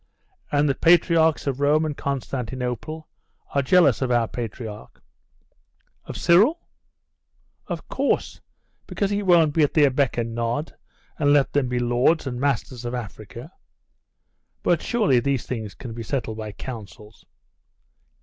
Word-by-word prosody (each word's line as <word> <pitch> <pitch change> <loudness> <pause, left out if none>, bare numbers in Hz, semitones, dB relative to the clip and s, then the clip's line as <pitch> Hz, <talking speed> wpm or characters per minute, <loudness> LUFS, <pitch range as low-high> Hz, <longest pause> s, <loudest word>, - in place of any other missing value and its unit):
'And 145 0 +2
the 140 - +2
patriarchs 165 0 +3
of 140 -2 -2
Rome 150 +2 +3
and 150 -2 -3
Constantinople 130 +2 -4 0.5
are 140 - +2
jealous 140 -3 +4
of 130 - 0
our 120 -2 +2
patriarch.' 110 -2 -7 1.1
'Of - - -7
Cyril?' 205 - +4 1.1
'Of - - -5
course, - - -1 0.5
because 200 -1 -2
he 205 0 0
won't 170 -6 +4
be 160 - +2
at 145 - +2
their 145 -3 +5
beck 135 -1 0
and 115 -1 -2
nod, 120 +6 -2 0.4
and 145 -2 +3
let 145 -2 +3
them 140 -3 +1
be 125 - -1
lords 120 +7 +2
and 125 -2 -4
masters 130 -2 -1
of 120 +1 -3
Africa.' 120 - -8 1.1
'But - - +2
surely 210 - +2
these 135 0 -1
things 110 -5 -5
can 120 -4 -8
be 115 - -6
settled 115 -2 -3
by 110 -1 -5
councils? 105 -3 -10
135 Hz, 140 wpm, -23 LUFS, 120-155 Hz, 1.1 s, their